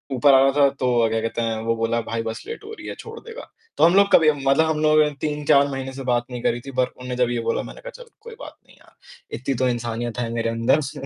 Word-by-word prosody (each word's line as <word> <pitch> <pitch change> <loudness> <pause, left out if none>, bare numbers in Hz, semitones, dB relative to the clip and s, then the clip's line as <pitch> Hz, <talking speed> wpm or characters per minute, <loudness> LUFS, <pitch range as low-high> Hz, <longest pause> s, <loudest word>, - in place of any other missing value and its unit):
ऊपर 135 +3 +5
आ 130 - +6
रहा 135 0 +4
था 140 -1 +4
तो 125 -1 +1
अ, 115 - +2
क्या 115 0 0
कहते 115 +1 -3
हैं 115 -1 -1
वो 115 0 +1
बोला 115 +1 0
"भाई 115 0 -4
बस 110 0 -6
लेट 455 -1 -7
हो 435 - -9
रही - - -10
है - - -6
छोड़ 450 0 -9
देगा?" 465 +1 -11 0.3
तो - - +2
हम 170 +2 +4
लोग 200 0 +4
कभी 155 -2 +6
मतलब 140 +1 +2
हम 160 -1 -1
लोगों 155 0 +5
ने 150 - -1
3-4 150 -2 +2
महीने 135 0 -5
से 135 0 -7
बात 120 -1 +1
नहीं 125 -1 -5
करी 120 +1 0
थी, 135 - -9
पर 130 0 +1
उन्होंने 125 0 -8
जब 120 - 0
ये 120 - -1
बोला - - -1
मैंने - - -11
कहा, - - -8
"चल 470 - -22
कोई 465 0 -11
बात - - -10
नहीं - - -20
यार - - -24 0.4
इतनी 135 +1 -3
तो 130 - +3
इंसानियत 120 0 -3
है 120 -1 -2
मेरे 115 0 -1
अंदर 115 +6 +1
स" 140 - -5
130 Hz, 290 wpm, -22 LUFS, 115-155 Hz, 0.4 s, आ